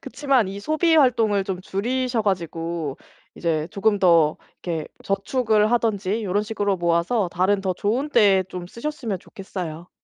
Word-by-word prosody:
그치만 270 -8 +1
이 195 +1 -6
소비 310 - +2
활동을 225 -8 +3
좀 190 -2 -4
줄이셔 240 +5 -1
가지고 170 -6 -2 0.4
이제 160 -2 -1
조금 205 +1 +1
더 165 -5 +4 0.3
이렇게 165 -3 -3 0.2
저축을 215 +2 +1
하든지 220 -3 0
요런 200 +2 0
식으로 205 -2 -1
모아서 175 +4 +1
다른 190 +3 +1
더 190 -1 -1
좋은 235 +10 -1
때에 200 -7 +5
좀 180 -1 -7
쓰셨으면 235 -2 -4
좋겠어요. 175 -3 -7
200 Hz, 325 characters per minute, -23 LUFS, 180-230 Hz, 0.4 s, 때에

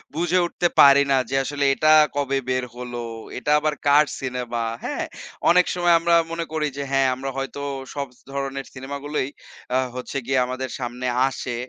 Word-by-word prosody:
বুঝে 175 +2 +1
উঠতে 175 0 0
পারি 140 0 +8
না 135 - +4
যে 135 - -1
আসলে 145 +1 -2
এটা 155 0 +4 0.2
কবে 140 -1 0
বের 130 0 0
হলো 120 -1 -6 0.4
এটা 145 +3 -1
আবার 155 0 0
কার 145 +2 +6
সিনেমা, 125 -3 -3 0.2
হ্যাঁ? - - -2 0.4
অনেক 180 +1 +6
সময় 175 -1 +3
আমরা 170 0 +3 0.2
মনে 165 0 -3
করি 155 -1 0
যে, 140 - -2
হ্যাঁ 135 -1 +3
আমরা 135 +1 -5
হয়তো 135 +1 -4 0.3
সব 140 -1 -3 0.2
ধরনের 135 -1 -4
সিনেমা 135 +2 -6
গুলোই 145 -2 -2 0.5
আ - - +4 0.2
হচ্ছে 125 +2 -5
গিয়ে 130 +1 +2
আমাদের 130 +1 -4
সামনে 125 +1 -4 0.2
আসে। 130 -2 -4
135 Hz, 175 wpm, -23 LUFS, 130-150 Hz, 0.5 s, পারি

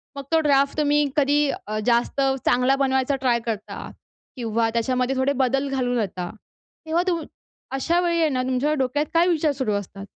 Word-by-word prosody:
मग 280 - -6
तो 325 - +4
ड्राफ्ट 280 -2 +2
तुम्ही 295 0 +3
कधी 290 0 +3 0.3
अ, 215 0 -2
जास्त 240 +3 +1 0.2
चांगला 255 +2 +3
बनवायचा 265 0 +1
ट्राय 255 -3 +1
करता 215 -3 -5 0.5
किंवा 230 -2 0
त्याच्यामध्ये 250 +3 0
थोडे 265 +2 +1
बदल 270 +2 0
घालवून 250 -2 -1
देता. 180 -4 -3 0.6
तेव्हा 330 +2 +1
तू 340 -2 +1 0.5
अशा 335 +6 +1
वेळी 340 -1 +1
आहे 320 -2 +3
ना, 255 -2 -1
तुमच्यावर 260 +4 0
डोक्यात 280 +3 0
काय 335 +1 +4
विचार 315 -3 +2
सुरू 260 -6 -1
असतात? 200 0 -5
270 Hz, 170 wpm, -23 LUFS, 245-295 Hz, 0.6 s, तो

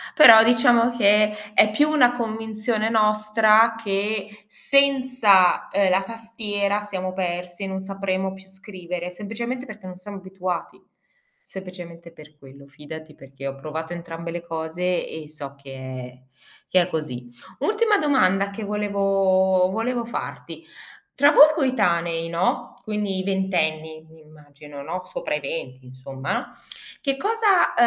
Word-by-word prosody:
Però, 230 -8 +10
diciamo, 235 +1 +4
che 210 -1 +2
è 215 - +5
più 295 +7 +2
una 250 -6 +4
convinzione 220 -1 -2
nostra 215 +1 +3
che 210 0 -3
senza, 255 -7 +3
uhm, 195 -1 +2
la 185 +1 +3
tastiera 210 -2 -3
siamo 190 -3 -4
persi, 180 0 -4
non 190 0 -4
sapremo 190 -1 -3
più 190 0 -14
scrivere, 180 -3 -7
semplicemente 235 +7 -5
perché 215 -5 -11
non 180 0 -9
siamo 200 +2 -9
abituati, 190 -2 -5 0.6
semplicemente 175 - -10
per 150 -2 -16
quello. 140 0 -15
Fidati, 155 +2 -11
perché 135 -1 -12
ho 135 - -5
provato 155 +4 -6
entrambe 170 0 -7
le 170 0 -6
cose 170 +2 -2
e 160 -1 -8
so 145 -3 -8
che 135 -1 -10
è 130 -1 -9 0.5
che 185 - +4
è - - -5
così. 125 -7 -5 0.3
Ultima 430 -1 +2
domanda 200 - +2
che 215 +2 -7
volevo 195 -2 +1
volevo 235 +3 -2
farti. 235 - -7 0.5
Tra 285 +2 +5
voi 300 0 +9
coetanei, 175 - 0
no, 170 +2 -1
quindi 205 -3 -2
ventenni 160 -5 -2 0.2
immagino, 145 -1 -14
no, 170 +6 -5
sopra 185 - -4
i - - -2
20, 130 -3 -6
insomma. 130 +1 -6 0.4
Che 275 -2 -1
cosa 420 0 +2
190 Hz, 130 wpm, -23 LUFS, 165-220 Hz, 0.6 s, Però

